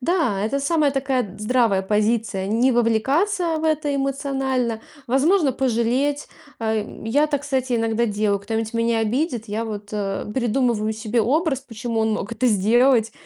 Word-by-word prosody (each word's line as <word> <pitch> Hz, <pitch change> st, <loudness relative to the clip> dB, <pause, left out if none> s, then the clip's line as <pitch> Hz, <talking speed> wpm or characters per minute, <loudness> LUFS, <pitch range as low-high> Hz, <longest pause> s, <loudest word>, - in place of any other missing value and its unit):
Да, 270 Hz, -, 0 dB
это 275 Hz, +6 st, -1 dB
самая 295 Hz, 0 st, +2 dB
такая 270 Hz, -1 st, 0 dB
д 200 Hz, -, -9 dB
здравая 215 Hz, -3 st, +2 dB
позиция. 210 Hz, -1 st, 0 dB
Не 235 Hz, +6 st, +2 dB
вовлекаться 290 Hz, -, +1 dB
в 315 Hz, -, -4 dB
это 305 Hz, -2 st, 0 dB
эмоционально, 270 Hz, -4 st, -1 dB, 0.3 s
возможно, 285 Hz, +4 st, +3 dB
пожалеть. 260 Hz, +3 st, 0 dB, 0.3 s
Э, 220 Hz, -2 st, 0 dB, 0.2 s
я 285 Hz, +7 st, +2 dB
так, 285 Hz, -2 st, -2 dB
кстати, 260 Hz, -3 st, -1 dB
иногда 225 Hz, 0 st, +1 dB
делаю. 205 Hz, -1 st, 0 dB
Кто-нибудь 220 Hz, +2 st, -3 dB
меня 230 Hz, 0 st, +1 dB
обидит, 235 Hz, +1 st, -1 dB
я 215 Hz, +2 st, -2 dB
вот, 210 Hz, -2 st, -6 dB
э, 195 Hz, -2 st, -2 dB
придумываю 235 Hz, -2 st, 0 dB
себе 220 Hz, +1 st, -1 dB
образ, 280 Hz, -, +1 dB
почему 230 Hz, -2 st, -4 dB
он 220 Hz, 0 st, +1 dB
мог 210 Hz, +1 st, -4 dB
это 240 Hz, +3 st, 0 dB
сделать. 225 Hz, +2 st, +3 dB
235 Hz, 155 wpm, -22 LUFS, 220-275 Hz, 0.3 s, возможно